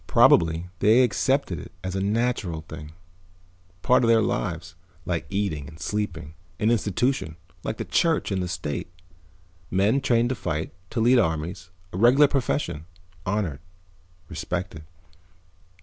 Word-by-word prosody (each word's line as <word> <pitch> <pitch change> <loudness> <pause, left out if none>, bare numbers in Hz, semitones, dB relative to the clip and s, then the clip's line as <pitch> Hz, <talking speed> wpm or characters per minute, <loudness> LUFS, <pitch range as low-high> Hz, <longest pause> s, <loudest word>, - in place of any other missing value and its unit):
Probably 80 +1 +4
they 115 +5 +5
accepted 130 -3 +1
it - - -10
as 95 0 -3
a 95 - -1
natural 105 -5 0
thing, 75 -1 -10 0.9
part 125 - +4
of - - +3
their 115 -1 +5
lives, 90 -8 -2 0.3
like 85 -1 -2
eating 95 -8 -2
and 80 +1 -13
sleeping. 85 -7 -3 0.3
An 110 +2 +3
institution, 110 - 0 0.3
like - - -3
the - - -4
church 165 -9 +1
and 95 -1 0
the 90 - -2
state. 90 -2 -4 0.8
Men 100 +9 +2
trained 120 -2 +2
to 130 - -1
fight, 80 -7 -3 0.2
to - - -3
lead 120 +2 +5
armies, 80 0 -2 0.2
a - - -4
regular 125 +7 +6
profession. 130 - -1 0.4
Honored, 95 -8 -1 0.7
respected." 80 0 -4
95 Hz, 135 wpm, -25 LUFS, 80-120 Hz, 0.9 s, regular